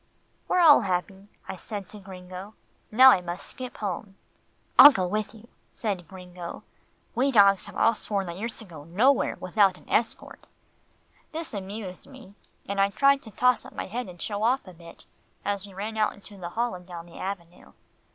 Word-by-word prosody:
"They're 365 - +3
all 315 -6 +8
happy," 190 0 -3 0.2
I 190 - -5
said 200 +1 -7
to 210 - -11
Gringo, 185 +1 -10 0.4
"now 260 +4 +9
I 185 - +3
must 175 +1 -6
skip 255 -2 -8
home." 195 0 -5 0.6
"I'll 290 - +12
go 185 -9 -1
with 210 +4 -3
you," 225 +1 -15 0.3
said 195 -7 -3
Gringo. 180 -1 -9 0.5
"We 270 +3 +1
dogs 200 -4 +5
have - - -11
all 230 - +4
sworn 200 -2 -2
that 170 -1 -6
you're 230 +3 -3
to 225 - -11
go 160 -6 -11
nowhere 225 - +2
without 190 0 +2
an - - -20
escort." 225 0 -2 0.9
This 325 -3 -5
amused 195 -1 -7
me, 260 -7 -14 0.3
and 200 0 0
I 195 - +3
tried 275 +7 +3
to 220 - -11
toss 250 +4 +2
up - - -13
my - - -5
head 230 +1 -5
and 175 -1 -12
show 205 +2 -4
off 245 +1 +1
a 185 - -11
bit, 170 0 -15 0.4
as 205 0 -2
we 195 - -14
ran 210 +3 -5
out 215 -1 +1
into 205 0 -15
the 175 -3 -7
hall 235 +6 -1
and 180 0 -10
down 170 -2 -8
the 170 - -13
avenue. 180 -3 -7
200 Hz, 190 wpm, -26 LUFS, 180-225 Hz, 0.9 s, I'll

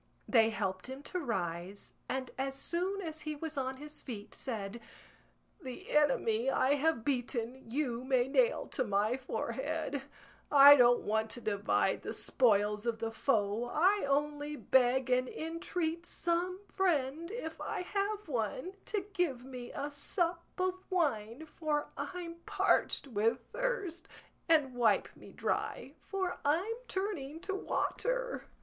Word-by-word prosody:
They 225 -3 +5
helped 195 -3 -2
him 265 +2 -7
to 365 - -3
rise, 190 - -3 0.2
and 260 -1 -2
as 270 0 -2
soon 365 +7 -1
as 315 -2 -5
he 305 0 -3
was 315 +1 -5
on 265 -1 -2
his 300 +2 -8
feet 215 -6 -7
said, 225 -3 -5 0.8
"The 255 -4 -8
enemy 265 -5 +3
I 270 +1 +3
have 290 -5 +1
beaten 245 -2 -2
you 250 -2 -1
may 260 -1 +2
nail 475 - +3
to 255 - 0
my 210 +1 +1
forehead; 265 - -3 0.5
I 285 0 +11
don't 245 -2 +6
want 220 +1 0
to 240 - -8
divide 205 -2 +1
the - - -4
spoils 210 -3 +2
of 230 -1 +1
the 225 0 -3
foe, 220 -2 +1
I 375 +11 +3
only 295 +1 0
beg 260 -2 +3
and 250 0 +3
entreat 330 +1 -3
some 355 +2 -1
friend, 335 -5 0
if 375 -8 -5
I - - -3
have 405 +2 -2
one, 255 - -2
to 405 -3 -2
give 290 -10 0
me 250 -2 -7
a 290 +1 -4
sup 340 +4 -1
of 370 0 0
wine, 275 - 0
for 300 -1 -2
I'm 345 -2 -5
parched - - +2
with 230 0 +1
thirst, - - -2 0.4
and 300 -5 +4
wipe 230 -4 +2
me - - -13
dry, 270 - -2
for 380 -2 -2
I'm 340 +10 +2
turning 325 -7 -3
to 390 - -3
water." - - -1
280 Hz, 145 wpm, -33 LUFS, 240-340 Hz, 0.8 s, I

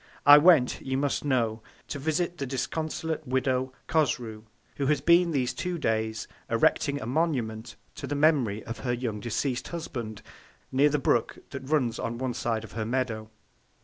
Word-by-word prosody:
I 145 +1 +10
went, 150 -6 +5
you 130 0 -2
must 140 0 0
know, 115 -6 0 0.3
to 140 - -4
visit 160 +4 -1
the 135 - -2
disconsolate 155 +3 -3
Widow 130 0 0 0.2
Cosrou, 120 -8 0 0.3
who 140 - 0
has 150 +1 +2
been 170 +1 +4
these 130 -6 0
two 180 -1 -3
Days 110 -5 -1 0.2
erecting 140 0 +2
a 110 - -6
Monument 120 -5 -1 0.2
to - - -5
the 145 - -2
Memory 140 -9 +2
of 115 +1 -7
her 120 -2 -1
young 120 -4 -3
deceased 120 +3 -2
Husband, 120 -10 -6 0.5
near 140 +3 +4
the 150 - +1
Brook 120 -4 +1
that 135 -1 -7
runs 130 -7 +1
on 115 +1 -3
one 130 0 -2
side 115 -2 -2
of 110 - -10
her 110 - -3
Meadow. 115 -2 -2
130 Hz, 170 wpm, -27 LUFS, 115-150 Hz, 0.5 s, I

